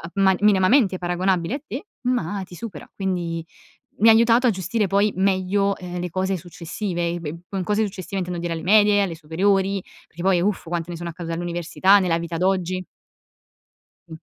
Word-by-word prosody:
uhm, 195 - +2
ma 190 0 +5
minimamente 205 +1 +4
paragonabile 180 +1 0
a 280 - -3
te, 260 - -6 0.2
ma 205 -6 -1
ti 180 -1 -12
supera. 190 -8 -8
Quindi 175 -4 -2 0.5
mi 225 +3 +6
ha - - +10
aiutato 230 +2 +5
a - - +6
gestire 195 +2 -1
poi 200 +2 +2
meglio, 195 +1 +1
ehm, 180 -1 -6
le 180 - -3
cose 190 +2 -1
successive. 175 +1 -4
E 175 - -4
b 155 0 -5
con 190 -2 -3
cose 210 +3 +1
successive 195 -1 -6
intendo 180 -1 -3
dire 170 0 -3
alle 165 -1 -3
medie, 205 +3 +5
alle 185 -4 -1
superiori, 190 +5 +1 0.2
perché 165 - -11
poi 185 -1 +3
uff 200 +2 0
quante 170 0 -3
ne 175 - -5
sono 170 0 -5
accadute 165 0 -6
all'università, 175 +3 +2
nella 175 -3 +1
vita 170 0 -5
d'oggi. 185 0 0 1.2
Mh. 160 - -8
185 Hz, 185 wpm, -23 LUFS, 175-200 Hz, 1.2 s, ha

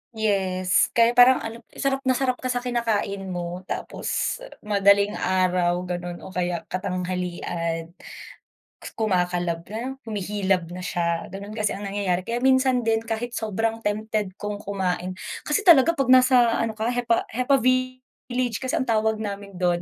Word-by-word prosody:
yes, 190 -4 +1
kaya 235 0 +3
parang 250 +1 +7
ano, 230 +1 -7
sarap 275 0 -1
na 260 - +2
sarap 255 0 +1
ka 255 -1 -2
sa 245 - 0
kinakain 215 -6 -2
mo 175 +1 -5
tapos - - -3 0.2
madaling 200 0 +3
araw 180 -1 +1
ganun 175 0 -4
o - - -10
kaya 175 -1 -2
katanghalian, 180 -2 -3 1.0
kumakalab 180 -5 0
na, 250 +6 -5
humihilab 195 -3 0
na 180 - -6
siya, 170 -2 -2
gano'n 200 +2 -7
kasi 215 -2 0
ang 205 - -7
nangyayari. 195 -3 -1
Kaya 235 +4 -2
minsan 260 -2 +3
din 225 0 +2
kahit 230 +1 -4
sobrang 225 +1 -2
tempted 210 -1 -1
kong 205 0 -4
kumain, 185 -2 -2 0.3
kasi 300 - +1
talaga 330 -1 +8
'pag 275 -6 -1
nasa 255 -2 +6
ano 225 -1 0
ka, 220 +1 -2
hepa-hepa 245 +2 +1
village 255 -1 -1
kasi 260 - 0
ang 260 - -2
tawag 220 -1 +1
namin 200 -3 -6
do'n. 175 -1 +1
210 Hz, 145 wpm, -24 LUFS, 185-240 Hz, 1.0 s, talaga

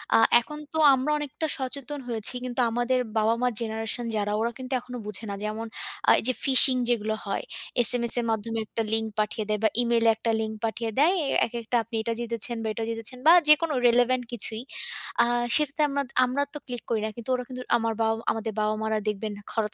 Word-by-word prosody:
আ - - +7 0.2
এখন 300 +6 -9 0.2
তো - - -2 0.2
আমরা 265 +3 0
অনেকটা 295 +2 -4
সচেতন 275 +2 -5
হয়েছি 230 +1 +1
কিন্তু 250 0 -2
আমাদের 245 +2 0 0.2
বাবা-মার 230 +3 +1
generation 225 +2 -3
যারা 205 0 -1
ওরা 230 +1 0
কিন্তু 260 0 -6
এখনো 250 0 -9
বোঝে 210 +2 -3
না। 200 - -4
যেমন 215 +2 -4 0.4
আ - - +8
এই - - -6
যে 255 - +3
phishing 260 -1 +5
যেগুলো 220 -2 0
হয়, 195 - -3 0.4
SMS 235 -2 +8
এর 235 - -2
মাধ্যমে 225 +1 -3
একটা 225 - -3
link 225 0 0
পাঠিয়ে 215 0 -1
দেয় 210 -1 0
বা 220 - +4
email 235 -1 +1
এ - - +7
একটা 225 +1 -2
link 220 0 -4
পাঠিয়ে 225 0 -3
দেয়, 345 +6 +4 0.3
একেকটা 235 +1 -5
আপনি 230 +1 -9
এটা 230 +1 -2
জিতেছেন 235 0 -2
বা - - -3
এটা 225 - -4
জিতেছেন 225 +2 -4
বা 335 - +9
যেকোনো 305 0 +4
relevant 245 +1 +2
কিছুই। 225 -1 0 0.6
আ - - +2 0.3
সেটাতে 300 0 +1
আমরা 280 0 -1 0.2
আমরা 270 +3 -1
তো - - -4
click 245 -3 -6
করি 220 -2 0
না - - -2
কিন্তু 235 +1 -9
ওরা 250 - -4
কিন্তু 255 0 -7 0.2
আমার 225 -1 -1
বাবা 225 0 +2 0.2
আমাদের 225 0 -4
বাবা-মারা 215 +1 -1
দেখবেন 210 +1 -2 0.2
হঠাৎ 215 -2 -2
235 Hz, 200 wpm, -26 LUFS, 220-255 Hz, 0.6 s, বা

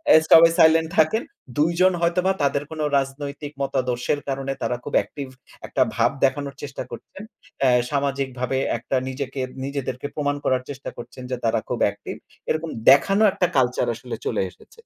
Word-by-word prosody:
এ - - +10
সবাই 165 0 +9
সাইলেন্ট 160 0 +5
থাকেন। 160 +9 +3 0.3
২ 155 +3 +3
জন 185 0 +5
হয়তোবা 180 +2 +2
তাদের 140 0 +1
কোন 160 - -7 0.2
রাজনৈতিক 140 +2 -4
মতাদর্শের 130 0 -1
কারণে 135 0 -2
তারা 125 - 0
খুব - - -7
অ্যাকটিভ 140 -2 -2 0.4
একটা - - -1
ভাব - - +3
দেখানোর 140 +1 -1
চেষ্টা 140 -1 -5
করছেন। 200 - -10 0.4
অ্যা 130 -2 +5 0.2
সামাজিকভাবে 135 -2 -1 0.2
একটা 120 +3 -3
নিজেকে, 135 0 -4 0.2
নিজেদেরকে 135 -1 -4
প্রমাণ 145 -1 0
করার 130 -1 +1
চেষ্টা 140 -1 -6
করছেন 130 - -9
যে, - - +1
তারা 115 0 +2
খুব 125 - -2
অ্যাক্টিভ। 100 0 -4 0.3
এরকম 160 +1 -1 0.2
দেখানো 195 +10 +5
একটা 180 - +1
কালচার 125 -1 +2
আসলে 120 +1 -6
চলে - - 0
এসেছে। 460 - -20
140 Hz, 160 wpm, -23 LUFS, 130-155 Hz, 0.4 s, এ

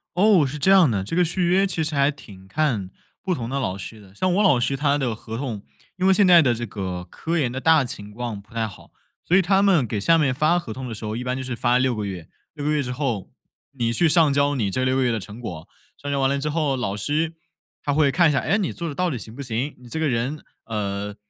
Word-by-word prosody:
哦， 190 -5 +5
是 150 +3 -5
这 190 +7 +3
样 185 -7 +6
的， 100 -4 -1
这 135 - -4
个 180 - +4
续 175 +2 0
约 195 +2 +3
其 165 -3 -2
实 155 0 -3
还 140 +1 +3
挺 100 -10 -11
看 115 -8 -1 0.3
不 185 -3 -1
同 115 -3 -5
的 140 +1 -2
老 95 -7 -2
师 110 +3 -9
的。 95 -1 -17
像 185 +6 0
我 210 - +3
老 145 -11 +4
师 130 +3 0
他 145 +1 +1
的 125 -5 -1
合 115 +1 -7
同 115 -7 -4 0.3
因 185 +1 +1
为 190 - +6
现 200 0 +4
在 175 -2 +8
的 125 -5 +2
这 120 +1 -4
个 95 -4 -5
科 165 - -3
研 130 -6 0
的 130 - -4
大 160 -3 +5
情 105 -5 -7
况 115 -2 -5
不 110 +3 -22
太 115 -1 -1
好， 100 - -14 0.3
所 180 - +2
以 190 - +6
他 190 +2 +3
们 180 -10 +4
给 105 -1 -3
下 165 +11 +4
面 140 -5 +2
发 155 +6 +2
合 115 -11 -5
同 130 -1 -6
的 115 - -6
时 110 - -5
候 105 +1 -3
一 125 - -4
般 125 +1 -2
就 130 - -4
是 125 -2 -4
发 120 +2 +2
6 130 -2 +1
个 105 -1 -3
月， 90 -5 -7 0.2
6 145 -2 -6
个 150 - +1
月 150 -1 +1
之 125 -2 -4
后， 125 -7 -3 0.4
你 115 -3 -1
去 165 +5 +4
上 155 -3 +4
交 145 0 +2
你 105 -6 -1
这 130 - 0
6 130 0 +1
个 130 - +2
月 120 - +2
的 115 - -1
成 105 +4 -10
果。 85 -9 -7 0.3
上 145 0 -4
交 140 - 0
完 135 0 +2
了 140 - 0
之 150 - -3
后 150 -3 0
老 105 -6 -2
师 155 +9 -1 0.5
他 145 - 0
会 145 -1 +3
看 170 +1 +4
一 - - +3
下， 135 - +2
哎， 200 - +1
你 200 - -1
做 170 -1 -5
得 140 - -7
到 180 -1 0
底 125 - -3
行 110 +2 -10
不 140 - -7
行， 125 +4 -3
你 125 - -14
这 160 - -4
个 160 - +1
人， 125 +5 -2 0.2
呃， 105 -2 -3
135 Hz, 300 characters per minute, -23 LUFS, 115-155 Hz, 0.5 s, 在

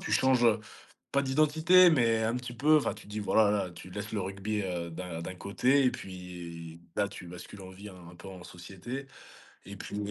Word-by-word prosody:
tu - - -4
changes 130 -2 +4 0.7
pas 140 - +3
d'identité, 155 +6 +5
mais 115 -6 +3
un 115 +2 0
petit 125 -1 -6
peu, 150 +5 +4
enfin 150 - +1
tu 105 - -13
te - - -16
dis: 105 +1 -4
«Voilà, 105 0 +4
là, 100 -3 0
tu 85 +2 -11
laisses 105 +3 -6
le 105 - -1
rugby, 100 +3 -3
heu, 85 -2 -3
d'un 85 -1 -6
d'un 95 +2 -6
côté, 125 +9 +2
et 125 - +5
puis, 85 -5 -8 0.2
là, 100 -1 +1
tu 90 - -10
bascules 90 +3 -10
en 95 - -9
vie 100 +3 -10
un 90 -1 -13
peu 95 - -11
en 90 -2 -10
société.». 100 +10 -8 0.6
Et 100 +1 -8
puis, 105 +2 -5
100 Hz, 210 wpm, -30 LUFS, 90-125 Hz, 0.7 s, d'identité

